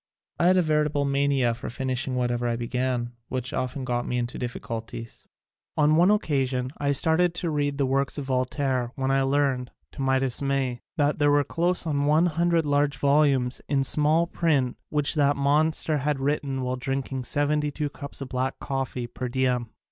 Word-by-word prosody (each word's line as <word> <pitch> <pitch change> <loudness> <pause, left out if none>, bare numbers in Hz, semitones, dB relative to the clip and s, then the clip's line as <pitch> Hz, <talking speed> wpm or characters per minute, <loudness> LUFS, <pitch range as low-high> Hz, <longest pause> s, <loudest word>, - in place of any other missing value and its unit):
I 170 - +4
had 185 +1 +5
a 180 - +4
veritable 150 -2 +1
mania 140 -3 +2
for 120 - -6
finishing 130 +1 -2
whatever 120 -1 0
I 120 - 0
began, 120 0 -2 0.2
which 130 0 -3
often 130 +1 -3
got 120 -1 -1
me 125 - -1
into 120 0 -3
difficulties. 115 -2 -6 0.5
On 150 0 +4
one 175 +4 +5
occasion 135 -10 0
I 140 -1 +1
started 165 +4 +2
to 170 -2 -2
read 145 -1 -1
the 140 - +2
works 135 +2 0
of 145 - -4
Voltaire 130 -1 -1
when 135 0 -1
I 135 0 +3
learned, 135 -2 +1 0.2
to 140 - -7
my 135 0 +2
dismay, 135 -1 -1 0.2
that 145 0 +1
there 145 0 +4
were 145 0 +4
close 175 +4 0
on 145 -3 0
one 155 +3 +4
hundred 170 0 +1
large 145 -1 +1
volumes 140 -3 +2
in 140 -2 +2
small 150 +4 +3
print 145 -8 0
which 150 -2 +1
that 145 -2 +3
monster 150 +2 +2
had 145 0 -1
written 135 -1 -1
while 125 0 -2
drinking 135 0 -3
seventy 150 +2 +1
two 150 +1 -3
cups 140 -1 -6
of 135 - -5
black 130 +1 -2
coffee 135 -2 -3
per 125 +1 -5
diem. 125 -2 0
140 Hz, 180 wpm, -26 LUFS, 130-150 Hz, 0.5 s, had